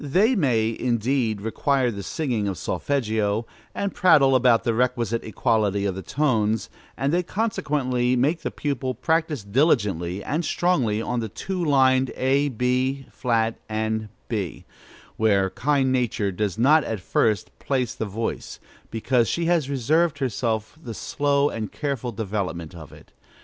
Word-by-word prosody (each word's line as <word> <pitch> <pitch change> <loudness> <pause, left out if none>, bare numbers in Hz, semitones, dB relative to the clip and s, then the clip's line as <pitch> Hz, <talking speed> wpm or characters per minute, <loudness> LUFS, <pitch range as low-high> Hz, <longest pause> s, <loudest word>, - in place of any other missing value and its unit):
They 195 - +3
may, 115 - +1
indeed, 120 -2 0
require 125 +3 +1
the 100 -2 -6
singing 120 - -2
of 95 -3 -3
solfeggio, 110 -1 -1 0.3
and 200 -1 -2
prattle 140 -7 +5
about 125 -2 +4
the 115 - +1
requisite 115 -1 0
equality 110 -3 0
of 100 - 0
the 95 - -6
tones; 110 -5 0 0.3
and 135 +4 0
they 175 - +3
consequently 140 - 0
make 145 +7 +1
the - - -2
pupil 130 -3 -3
practise 160 -6 0
diligently 100 - +1
and 160 +4 -1
strongly 125 -13 +1
on 125 - -1
the 110 -1 -3
two 180 - -4
lined 130 -3 +3
a, 140 +2 +2
b 130 +2 0
flat, 115 -3 0 0.7
b, 100 -8 -4 0.5
where 100 -3 +2
kind 135 -1 +1
Nature 120 -5 0
does 95 -1 -2
not 145 +6 +5
at 110 -2 -3
first 105 +3 0
place 130 -4 -1
the - - -4
voice, 110 +3 -4 0.3
because 115 +1 +1
she 170 - -1
has 165 -5 +1
reserved 145 +5 +1
for 140 - -1
herself 110 +2 -2
the 115 -7 -7
slow 140 +3 +1
and 110 -2 -4
careful 135 -5 -3
development 95 -7 -4
of 80 -4 -11
it. - - -16
125 Hz, 150 wpm, -24 LUFS, 110-140 Hz, 0.7 s, prattle